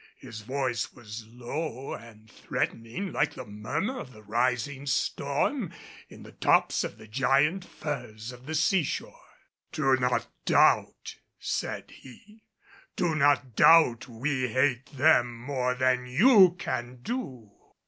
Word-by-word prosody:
His 110 -1 -9
voice 130 +1 -2
was 110 -2 -9
low 125 +3 -5
and 110 -2 -12
threatening 115 - -4
like 150 0 0
the 130 - -7
murmur 130 - -3
of 130 - -9
the 110 - -15
rising 125 +5 -1
storm 140 - -1 0.4
in - - -13
the - - -12
tops - - +2
of - - -6
the 110 - -14
giant 135 - +2
firs 120 -9 -6
of 125 +2 -14
the 160 - -3
seashore. 160 0 0 0.5
"Do 135 -3 +2
not 125 -1 0 0.2
doubt," - - +2 0.2
said - - -4
he. 210 - -16 0.5
"Do 170 -2 0
not 145 -5 +2
doubt 140 -8 +6
we 130 +2 -2
hate 130 +1 +1
them 130 -4 +3
more 125 0 -1
than 125 -1 +1
you 185 - +6
can 120 -6 -4
do." 130 - -5
130 Hz, 130 wpm, -28 LUFS, 120-150 Hz, 0.5 s, doubt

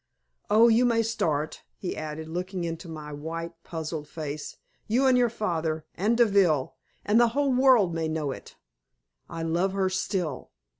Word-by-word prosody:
Oh, 225 +3 +6
you 230 +1 +5
may 230 -2 +3
start!" 160 -9 -1 0.2
he 185 - -4
added, 155 0 -5
looking 180 +2 -4
into 165 +1 -5
my 150 -2 -7
white, 165 +3 -5
puzzled 160 -2 -5
face; 150 -1 -6 0.3
"you 245 +5 +2
and 260 -1 +5
your 245 -1 +4
father, 160 -8 -2
and 215 +6 +1
Deville, 195 - +3 0.3
and 210 +3 +4
the 240 - +6
whole 280 -2 +2
world 250 -8 +5
may 165 -1 -1
know 155 -3 -2
it. - - -10 0.7
I 165 - -5
love 175 +4 0
her 190 -1 0
still! 180 -6 -2
175 Hz, 160 wpm, -27 LUFS, 160-220 Hz, 0.7 s, Oh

